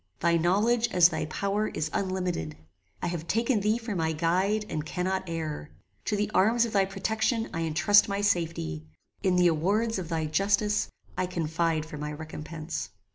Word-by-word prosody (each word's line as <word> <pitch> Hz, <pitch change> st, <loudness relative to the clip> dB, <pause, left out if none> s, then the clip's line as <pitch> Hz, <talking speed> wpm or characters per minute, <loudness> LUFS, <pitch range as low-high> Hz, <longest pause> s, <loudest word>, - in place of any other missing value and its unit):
Thy 170 Hz, 0 st, +3 dB
knowledge, 210 Hz, +8 st, +3 dB
as 180 Hz, -4 st, +6 dB
thy 160 Hz, -2 st, -2 dB
power, 200 Hz, +7 st, -1 dB
is 155 Hz, 0 st, -3 dB
unlimited. 180 Hz, -, -2 dB, 0.5 s
I -, -, +1 dB
have 170 Hz, -1 st, -4 dB
taken 230 Hz, +1 st, +2 dB
thee 210 Hz, +3 st, +2 dB
for 230 Hz, -2 st, -5 dB
my 160 Hz, -2 st, 0 dB
guide, 185 Hz, +7 st, +1 dB
and 155 Hz, -5 st, -3 dB
cannot 185 Hz, +4 st, -2 dB
err. 155 Hz, -2 st, -4 dB, 0.4 s
To 210 Hz, -, 0 dB
the 210 Hz, +1 st, -1 dB
arms 230 Hz, +5 st, +4 dB
of 230 Hz, -, -6 dB
thy 195 Hz, -2 st, +4 dB
protection, 220 Hz, +4 st, -1 dB
I 165 Hz, -, -2 dB
entrust 175 Hz, +7 st, +4 dB
my 200 Hz, 0 st, -1 dB
safety. 165 Hz, -, -1 dB, 0.3 s
In 185 Hz, -1 st, +2 dB
the 180 Hz, 0 st, +4 dB
awards 195 Hz, +7 st, +2 dB
of 170 Hz, -3 st, -6 dB
thy 160 Hz, -2 st, -1 dB
justice, 200 Hz, +6 st, +1 dB, 0.3 s
I 185 Hz, -, -1 dB
confide 165 Hz, -2 st, -1 dB
for 150 Hz, -2 st, -8 dB
my 150 Hz, 0 st, -4 dB
recompense. 155 Hz, +1 st, -6 dB
180 Hz, 175 wpm, -28 LUFS, 160-205 Hz, 0.5 s, as